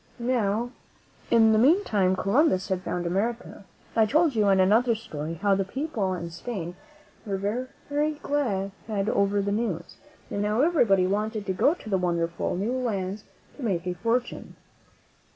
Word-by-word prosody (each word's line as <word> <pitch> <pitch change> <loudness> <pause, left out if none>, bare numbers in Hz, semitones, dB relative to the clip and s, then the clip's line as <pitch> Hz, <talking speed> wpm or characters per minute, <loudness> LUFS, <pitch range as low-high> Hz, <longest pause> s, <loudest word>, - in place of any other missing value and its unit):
Now, 235 -1 0 0.6
in 225 -1 +5
the 215 - +4
meantime, 225 - +3
Columbus 200 - +2
had 185 -1 -1
found 180 -1 -3
America. 200 +3 -2 0.3
I 220 -1 +4
told 310 +4 +3
you, 215 -3 +2
in 195 -1 +4
another 225 +5 +4
story, 160 -7 -6
how 200 +4 +2
the 195 0 +1
people 215 -4 -2
in 170 -1 -6
Spain 175 -1 -5 0.5
were 200 -3 -2
very 255 +8 -2
glad 205 -10 -1 0.2
over 200 -1 +1
the 200 - -1
news, 200 -6 -3 0.3
and 205 - -1
how 210 +4 +1
everybody 235 - +4
wanted 210 +2 -1
to 190 - -1
go 285 - +3
to 300 - -14
the 195 -3 +1
wonder 170 -2 0
ful 170 - -3
new 205 +7 -1
lands 205 -6 -2 0.3
to - - -10
make 185 -7 -1
a 180 - -1
fortune. 230 +7 -2
205 Hz, 160 wpm, -26 LUFS, 190-240 Hz, 0.6 s, in